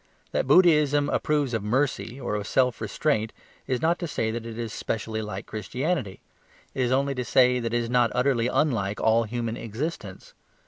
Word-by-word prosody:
That -, -, -1 dB
Buddhism 150 Hz, -3 st, +5 dB
approves 145 Hz, -4 st, 0 dB
of 115 Hz, -, 0 dB
mercy 125 Hz, +2 st, -1 dB
or 125 Hz, -, -3 dB
of 105 Hz, 0 st, -3 dB
self 125 Hz, -4 st, +1 dB
restraint 110 Hz, 0 st, 0 dB, 0.4 s
is 130 Hz, 0 st, -1 dB
not 170 Hz, +2 st, +2 dB
to 170 Hz, -, -3 dB
say 110 Hz, -7 st, -1 dB
that 115 Hz, 0 st, -5 dB
it 115 Hz, -1 st, -7 dB
is 115 Hz, -2 st, -4 dB
specially 110 Hz, 0 st, -3 dB
like 105 Hz, 0 st, -6 dB
Christianity; 125 Hz, -, -3 dB, 0.5 s
it -, -, -2 dB
is 125 Hz, -1 st, +1 dB
only 140 Hz, +1 st, +1 dB
to 125 Hz, -1 st, -3 dB
say 125 Hz, +1 st, +4 dB
that 115 Hz, -1 st, -3 dB
it 120 Hz, -, +1 dB
is 120 Hz, -1 st, -1 dB
not 120 Hz, -1 st, +3 dB
utterly 125 Hz, -2 st, +2 dB
unlike 110 Hz, -9 st, 0 dB
all 115 Hz, +1 st, +3 dB
human 115 Hz, 0 st, -3 dB
existence. 110 Hz, -, -6 dB
120 Hz, 185 wpm, -26 LUFS, 110-140 Hz, 0.5 s, Buddhism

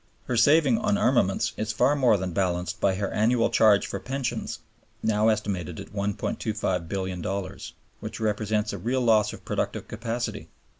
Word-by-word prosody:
Her 125 Hz, -, -2 dB
saving 155 Hz, -, +4 dB
on 210 Hz, -1 st, +1 dB
armaments 120 Hz, -, +2 dB
is 110 Hz, +1 st, -2 dB
far 145 Hz, -, +3 dB
more 125 Hz, -7 st, +4 dB
than 95 Hz, -2 st, -4 dB
balanced 90 Hz, -1 st, -1 dB
by 95 Hz, -1 st, +3 dB
her 100 Hz, 0 st, -2 dB
annual 115 Hz, +2 st, +2 dB
charge 105 Hz, -2 st, +5 dB
for -, -, -4 dB
pensions 135 Hz, 0 st, -3 dB, 0.5 s
now 110 Hz, 0 st, +2 dB
estimated 95 Hz, -6 st, -1 dB
at -, -, -10 dB
$1,250,000,000, 95 Hz, -2 st, -3 dB, 0.3 s
which -, -, -7 dB
represents 105 Hz, 0 st, 0 dB
a -, -, -5 dB
real 130 Hz, +3 st, 0 dB
loss 110 Hz, -3 st, +3 dB
of -, -, -11 dB
productive -, -, -2 dB
capacity. 115 Hz, +2 st, -4 dB
105 Hz, 150 wpm, -26 LUFS, 100-120 Hz, 0.5 s, charge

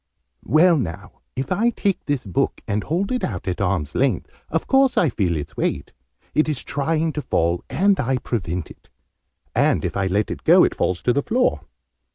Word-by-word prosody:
"Well, 170 Hz, +2 st, +5 dB
now, 90 Hz, -4 st, -6 dB
if 130 Hz, +5 st, -4 dB
I 215 Hz, +6 st, +3 dB
take 200 Hz, -4 st, -1 dB
this 145 Hz, -5 st, -1 dB
book, 95 Hz, -, -1 dB
and 105 Hz, +1 st, -1 dB
hold 180 Hz, -, -1 dB
it 250 Hz, -, -1 dB
out 95 Hz, -5 st, -3 dB
at 90 Hz, 0 st, -2 dB
arm's 90 Hz, -6 st, -1 dB
length, 130 Hz, -9 st, 0 dB, 0.2 s
of -, -, -1 dB
course 270 Hz, -1 st, +3 dB
I 165 Hz, -, +4 dB
feel 90 Hz, -8 st, 0 dB
its 75 Hz, -, -6 dB
weight. -, -, -2 dB, 0.4 s
It 155 Hz, +1 st, +2 dB
is 145 Hz, -4 st, -3 dB
trying 155 Hz, +2 st, -1 dB
to 150 Hz, -, -3 dB
fall, 85 Hz, -, 0 dB
and 195 Hz, +2 st, +2 dB
I 130 Hz, -1 st, +1 dB
prevent 90 Hz, -9 st, -3 dB
it. -, -, -17 dB, 0.6 s
And, -, -, +2 dB
if -, -, -3 dB
I 95 Hz, -1 st, 0 dB
let 100 Hz, +3 st, -1 dB
go, -, -, +7 dB
it -, -, +2 dB
fails 90 Hz, -1 st, -1 dB
to 125 Hz, -, +3 dB
the 140 Hz, -, +1 dB
floor. 250 Hz, -, +1 dB
130 Hz, 195 wpm, -22 LUFS, -, 0.6 s, go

